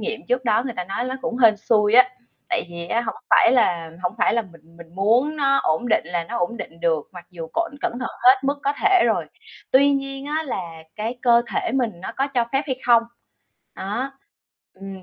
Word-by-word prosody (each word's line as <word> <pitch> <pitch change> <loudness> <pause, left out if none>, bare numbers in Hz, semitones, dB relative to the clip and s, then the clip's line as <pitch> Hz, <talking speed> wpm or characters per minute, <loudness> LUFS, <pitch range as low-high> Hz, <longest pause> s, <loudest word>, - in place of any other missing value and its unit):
nghiệm 220 - -4
trước 250 +1 0
đó 225 -1 +2
người 250 - -3
ta 180 - -3
nói 195 +6 -3
ló 255 +1 -3
cũng 240 - -3
hên 225 -4 +5
xui 210 0 +2
á. 255 +1 +7 0.4
Tại 360 - 0
vì 170 0 -7
á 230 - +1
hổng 225 -2 -4 0.2
phải - - +6
là 170 -10 +1
hổng 180 0 -1
phải - - +3
là 235 - +1
mình 165 -4 -19
mình 170 0 -15
muốn 235 +10 +2
nó 275 -2 +3
ổn 160 +10 0
định 215 -7 +2
là 175 -1 -2
nó 165 - -5
ổn 175 +7 -1
định 165 -6 -9
được, 160 -3 0
mặc 175 -1 -11
dù 170 -3 -7
cộn 335 -1 -1
cẩn - - -1
thận 255 - -3
hết 255 +1 +7
mức 280 +1 0
có 280 - +1
thể 390 -3 +5
rồi, - - +1 0.5
tuy 280 +2 +5
nhiên 275 0 -3
á 305 +2 -1
là 255 -10 -4 0.3
cái 225 +3 -4
cơ 235 -1 +5
thể - - -1
mình 250 -4 0
nó - - -6
có 270 - +1
cho 240 -2 +2
phép 270 +1 +1
hay 260 -3 -2
không. 235 -1 +6 0.7
Đó, 235 +8 -4 0.6
ừm, 195 -1 -10
235 Hz, 230 wpm, -22 LUFS, 185-265 Hz, 0.7 s, á